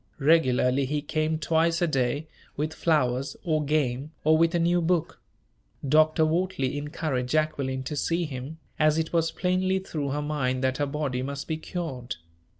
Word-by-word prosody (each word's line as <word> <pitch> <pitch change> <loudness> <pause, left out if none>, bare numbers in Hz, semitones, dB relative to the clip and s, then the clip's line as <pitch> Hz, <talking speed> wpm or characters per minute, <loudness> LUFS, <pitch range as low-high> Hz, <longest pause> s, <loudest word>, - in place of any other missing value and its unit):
Regularly 135 -3 +3
he 145 +2 -2
came 155 +1 0
twice 165 +1 +1
a 175 - +3
day, 135 -1 0 0.3
with 155 +2 -1
flowers, 135 -6 0
or 155 -4 +1
game, 140 -2 0
or 155 +1 +5
with 165 +2 +3
a - - +2
new 175 +1 +2
book. 170 -1 0 0.7
Dr. 155 +2 +4
Wortley 165 -4 0
encouraged 145 -3 -2
Jacqueline 140 -3 0
to 140 +3 -4
see 165 +4 0
him, 140 +2 -6 0.2
as 155 0 +4
it 160 +1 -2
was 165 -1 +2
plainly 185 +2 0
through 155 -7 -3
her 145 +2 -1
mind 135 -4 -1
that 130 0 +1
her 145 - 0
body 140 -3 -2
must 140 +1 -5
be 160 - -1
cured. 150 -7 -5
155 Hz, 165 wpm, -26 LUFS, 135-165 Hz, 0.7 s, or